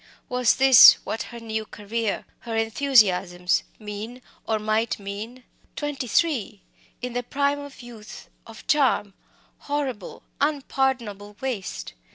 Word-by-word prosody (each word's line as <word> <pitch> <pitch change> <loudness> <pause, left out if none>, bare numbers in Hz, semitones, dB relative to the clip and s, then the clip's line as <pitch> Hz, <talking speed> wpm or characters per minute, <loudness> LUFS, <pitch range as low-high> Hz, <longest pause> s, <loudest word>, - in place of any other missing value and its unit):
Was 250 -2 +2
this 265 -2 +9
what 225 - -3
her 235 - -9
new 220 -1 -3
career 215 +1 -3
her 230 -1 -6
enthusiasms 205 -7 +2 0.2
meant, 215 +4 -8 0.2
or 220 - +1
might 215 +2 0
mean! 210 +5 -7 0.3
Twenty 290 -4 -4
three! 235 - 0 0.4
in 250 -1 -4
the 245 - -1
prime 280 +3 0
of 285 -3 -10
youth, 225 -3 -11 0.2
of 225 -1 -12
charm! 260 -9 +2 0.5
Horrible, 270 -9 -4 0.2
unpardonable 260 -8 -1
waste! 200 - -4
230 Hz, 120 wpm, -24 LUFS, 210-265 Hz, 0.5 s, this